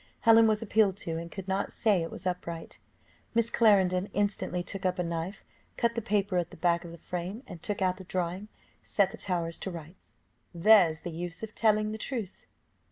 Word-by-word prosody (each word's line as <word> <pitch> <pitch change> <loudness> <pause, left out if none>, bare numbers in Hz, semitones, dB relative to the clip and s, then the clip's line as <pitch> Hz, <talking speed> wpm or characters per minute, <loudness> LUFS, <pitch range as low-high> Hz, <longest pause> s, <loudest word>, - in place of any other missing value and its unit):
Helen 225 -1 +7
was 215 0 +1
appealed 210 -3 +3
to, 165 -1 -2
and 170 +1 -6
could 195 -2 -7
not 195 +1 -1
say 205 -6 +2
it 165 - -3
was 185 - -8
upright; 170 -2 -4 0.6
Miss 230 0 +2
Clarendon 195 -4 +4
instantly 200 -3 0
took 195 +2 -6
up 185 0 +1
a 180 - 0
knife, 170 +4 -4 0.3
cut 235 0 +2
the 230 - -2
paper 200 -2 0
at 175 -1 -2
the - - -13
back 170 -1 +2
of 170 - -9
the 170 - -10
frame, 180 - -5
and, 170 - -10
taking 200 -2 -1
out 185 0 0
the 190 - -9
drawing, 185 +2 -3 0.3
set 195 -2 +1
the - - -9
tower 170 -3 -2
to 180 - -5
rights. 170 0 -10 0.4
"There's 170 -3 +5
the 175 - -5
use 175 +3 -6
of 220 -1 -6
telling 215 -1 +2
the 220 - -5
truth." 220 -6 -5
185 Hz, 205 wpm, -29 LUFS, 175-210 Hz, 0.6 s, Helen